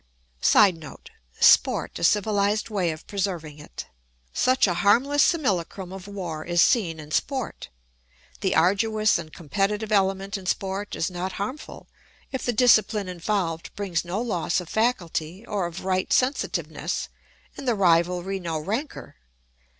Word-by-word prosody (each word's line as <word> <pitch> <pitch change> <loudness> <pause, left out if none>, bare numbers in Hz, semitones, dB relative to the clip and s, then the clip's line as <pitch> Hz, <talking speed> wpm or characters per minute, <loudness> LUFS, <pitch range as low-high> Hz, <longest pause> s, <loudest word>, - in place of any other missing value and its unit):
[Sidenote: 165 -7 +2 0.3
Sport - - +4
a - - -5
civilised 210 +3 +2
way 190 -5 0
of 155 -1 -6
preserving 175 -7 -3
it.] 65 - -9 0.5
Such 255 +1 +3
a 180 - +1
harmless 240 +11 +3
simulacrum 195 - 0
of 190 0 -9
war 175 -6 -5
is 175 +1 -1
seen 175 -6 +3
in 150 0 -10
sport. 265 - -2 0.7
The 190 - 0
arduous 210 +5 +3
and 155 -2 -8
competitive 205 +7 -2
element 195 0 +1
in 185 - -10
sport 195 +2 -2
is 170 - -1
not 180 +1 -4
harmful, 230 +11 -6 0.4
if 265 - -3
the 245 - 0
discipline 215 -4 +3
involved 175 -2 -3
brings 190 -5 -2
no 175 +4 -3
loss 195 -8 -1
of 175 -2 -8
faculty 190 -5 -1
or 205 -6 -2
of 175 +2 -8
right 185 -1 0
sensitiveness, 260 +3 -1 0.5
and 275 - -8
the 240 - +3
rivalry 180 +1 +2
no 165 -3 -3
rancour. 215 - -5
195 Hz, 140 wpm, -25 LUFS, 175-215 Hz, 0.7 s, Sport